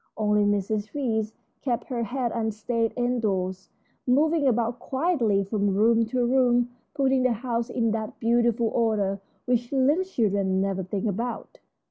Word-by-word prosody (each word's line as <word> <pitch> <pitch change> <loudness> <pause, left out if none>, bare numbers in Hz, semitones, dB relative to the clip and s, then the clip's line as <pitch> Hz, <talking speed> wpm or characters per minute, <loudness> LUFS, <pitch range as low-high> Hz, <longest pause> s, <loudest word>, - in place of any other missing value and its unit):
Only 210 -1 +2
Mrs. 205 +3 -1
Reece 220 -6 -1 0.3
kept 245 -3 -1
her 245 -3 -3
head 245 +1 -2
and 220 -1 -1
stayed 230 +1 -1
indoors, 200 -7 -1 0.4
moving 295 +3 +3
about 235 0 +1
quietly 260 - +1
from 200 -1 0
room 225 +2 +3
to 245 +1 0
room, 245 -1 +3 0.3
putting 270 -2 +2
the 255 -1 +3
house 235 +1 -2
in 230 -3 0
that 220 -1 -4
beautiful 235 0 +2
order 210 -5 0 0.2
which 240 -1 0
little 285 +6 +3
children 200 - 0
never 195 0 -1
think 190 +2 -3
about. 225 +3 -4
230 Hz, 145 wpm, -26 LUFS, 210-250 Hz, 0.4 s, moving